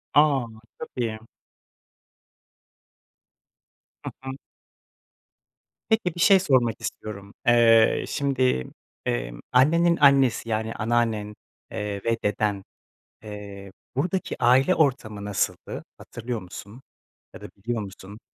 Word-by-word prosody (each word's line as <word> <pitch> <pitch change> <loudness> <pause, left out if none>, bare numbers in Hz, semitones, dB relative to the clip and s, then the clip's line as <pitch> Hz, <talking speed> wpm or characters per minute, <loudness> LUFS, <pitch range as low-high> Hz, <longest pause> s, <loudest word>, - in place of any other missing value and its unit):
A! 145 -4 +4 0.3
Çok - - -6
iyi. 115 -3 -2 2.8
Hı - - -4
hı. 135 0 -5 1.6
Peki, 220 -7 +1
bir - - -8
şey 195 +1 +7
sormak 130 - +1
istiyorum. 100 -1 -7
Eee, 115 -2 +5
şimdi, 130 - 0 0.4
emm, - - -2
annenin 170 +7 +4
annesi, 135 -5 +4
yani, 110 0 -1
anneannen, 110 -2 -1 0.4
eee, 105 -1 -4
ve 115 0 +1
deden, 105 -1 0 0.6
eee, 100 -2 -9 0.2
buradaki 180 +7 -2
aile 130 +9 +5
ortamı 110 -9 0
nasıldı? 105 -1 -2
Hatırlıyor 115 -1 -6
musun? 100 +6 -10 0.5
Ya - - -11
da - - -9
biliyor 115 +3 -3
musun? 100 +1 -10
115 Hz, 100 wpm, -25 LUFS, 105-135 Hz, 2.8 s, şey